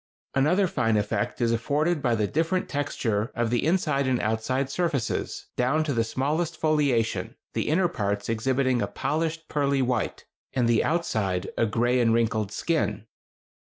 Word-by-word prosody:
Another 155 Hz, +9 st, +3 dB
fine 115 Hz, -10 st, +1 dB
effect 105 Hz, +3 st, -1 dB
is 115 Hz, -1 st, +3 dB
afforded 150 Hz, +7 st, +1 dB
by 120 Hz, -4 st, +2 dB
the 110 Hz, -2 st, +1 dB
different 165 Hz, -, 0 dB
texture 115 Hz, -7 st, -1 dB
of 120 Hz, -1 st, 0 dB
the 120 Hz, -, +1 dB
inside 155 Hz, -5 st, +1 dB
and 125 Hz, -2 st, +1 dB
outside 110 Hz, +5 st, 0 dB
surfaces, 160 Hz, -9 st, -1 dB
down 135 Hz, +6 st, +2 dB
to 150 Hz, -2 st, -1 dB
the 115 Hz, -2 st, +2 dB
smallest 150 Hz, +8 st, -1 dB
foliation, 145 Hz, -8 st, +1 dB, 0.2 s
the -, -, -1 dB
inner 175 Hz, +4 st, +3 dB
parts 100 Hz, -10 st, -2 dB
exhibiting 130 Hz, +2 st, +1 dB
a -, -, 0 dB
polished 160 Hz, +1 st, -2 dB
pearly 140 Hz, -2 st, +1 dB
white, 125 Hz, -2 st, -1 dB, 0.3 s
and 125 Hz, -3 st, +2 dB
the 115 Hz, -1 st, +3 dB
outside 100 Hz, -, -1 dB
a 115 Hz, -, +2 dB
gray 120 Hz, +4 st, +1 dB
and 115 Hz, -2 st, +3 dB
wrinkled 110 Hz, -3 st, 0 dB
skin. 110 Hz, -, -1 dB
130 Hz, 155 wpm, -26 LUFS, 115-155 Hz, 0.3 s, Another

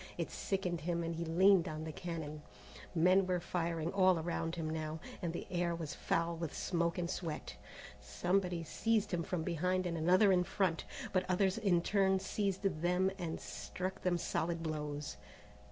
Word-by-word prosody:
It -, -, -2 dB
sickened 180 Hz, -3 st, -2 dB
him 170 Hz, +1 st, -1 dB
and 165 Hz, 0 st, -2 dB
he 165 Hz, -, -2 dB
leaned 180 Hz, +2 st, +5 dB
on 155 Hz, -1 st, -4 dB
the 160 Hz, -, -4 dB
cannon. 155 Hz, -2 st, -5 dB, 0.5 s
Men 185 Hz, +3 st, +5 dB
were 180 Hz, -1 st, +1 dB
fighting 170 Hz, -1 st, -2 dB
all 185 Hz, -2 st, +5 dB
around 165 Hz, 0 st, -2 dB
him 165 Hz, -2 st, -3 dB
now, 155 Hz, 0 st, -3 dB, 0.2 s
and 170 Hz, -, -1 dB
the 170 Hz, -, -5 dB
air 175 Hz, -1 st, 0 dB
was 160 Hz, -4 st, -4 dB
foul 165 Hz, 0 st, 0 dB
with 165 Hz, -2 st, -4 dB
smoke 170 Hz, -2 st, 0 dB
and 175 Hz, -1 st, -1 dB
sweat. 165 Hz, -3 st, -4 dB, 0.4 s
Somebody 180 Hz, -2 st, 0 dB
seized 220 Hz, +5 st, 0 dB
him 175 Hz, -, +1 dB
from 170 Hz, 0 st, -2 dB
behind 180 Hz, +2 st, 0 dB
and 170 Hz, -1 st, -1 dB
another 185 Hz, +5 st, +5 dB
in 180 Hz, -1 st, +4 dB
front, 185 Hz, -2 st, 0 dB, 0.3 s
but 185 Hz, -1 st, +1 dB
others 190 Hz, +2 st, +2 dB
in 180 Hz, -6 st, +3 dB
turn 190 Hz, -1 st, +3 dB
seized 195 Hz, 0 st, -1 dB
them 180 Hz, +1 st, +2 dB
or 165 Hz, -2 st, -3 dB
struck 185 Hz, +1 st, -5 dB
them 180 Hz, -1 st, +2 dB
solid 170 Hz, 0 st, -1 dB
blows. 150 Hz, -3 st, -3 dB
175 Hz, 170 wpm, -35 LUFS, 165-185 Hz, 0.5 s, leaned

